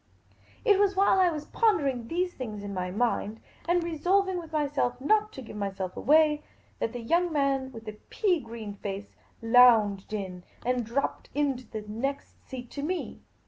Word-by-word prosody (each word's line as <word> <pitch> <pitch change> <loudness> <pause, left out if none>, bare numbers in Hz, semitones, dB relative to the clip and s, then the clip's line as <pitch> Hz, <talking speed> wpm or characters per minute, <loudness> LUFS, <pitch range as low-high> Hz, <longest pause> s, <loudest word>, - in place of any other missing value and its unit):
It 410 -4 +5
was 400 -1 +3
while 385 0 +4
I 365 -1 +5
was 305 -3 -4
pondering 285 - +1
these 355 +4 -1
things 215 -5 -6
in 200 0 -5
my 180 -1 -2
mind, 220 +1 -1 0.3
and 350 0 +3
resolving 360 +3 +1
with 325 -2 -10
myself 285 -5 0
not 425 +9 +2
to 265 - -8
give 220 - -10
my.self 195 -2 -4
away, 300 +1 +4 0.4
that 225 - -1
the 245 - -5
young 340 +9 +1
man 275 -3 +1
with 225 -2 -10
the 215 -1 -8
pea 375 -6 +2
green 225 -4 -7
face 200 0 -6 0.3
lounged 225 -5 +5
in 190 -4 -5 0.2
and 250 0 +1
dropped 235 +5 -2
into 270 -5 0
the 215 -1 -5
next 270 +7 -4
seat 250 -2 -7
to 285 - -5
me. 350 +5 -3
260 Hz, 175 wpm, -28 LUFS, 220-335 Hz, 0.4 s, It